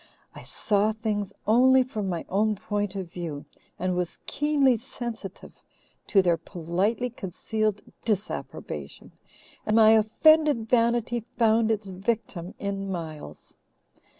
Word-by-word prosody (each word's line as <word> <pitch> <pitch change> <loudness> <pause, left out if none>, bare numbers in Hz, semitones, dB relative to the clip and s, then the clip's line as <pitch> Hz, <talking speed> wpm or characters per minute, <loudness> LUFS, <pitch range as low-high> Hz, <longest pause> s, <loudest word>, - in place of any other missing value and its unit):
I - - -10
saw 210 +1 0
things 210 -2 -2
only 260 +4 +5
from 215 -6 -4
my 170 -2 -3
own 210 +3 +1
point 205 0 -3
of 185 -3 -5
view, 160 -5 -5 0.3
and 185 0 -1
was 180 -1 -2
keenly 285 -3 +2
sensitive 230 -4 -7 0.6
to 195 -2 +4
their 175 -2 +3
politely 190 +10 -2
concealed 215 +1 -2 0.2
disapprobation, 210 -3 -4 0.5
and 215 - 0
my 220 -1 +7
offended 235 +3 +4
vanity 235 0 +2
found 225 -1 +3
its 210 -3 -1
victim 190 -2 -3
in 195 -1 -3
Miles. 155 - -7
215 Hz, 120 wpm, -26 LUFS, 190-230 Hz, 0.6 s, my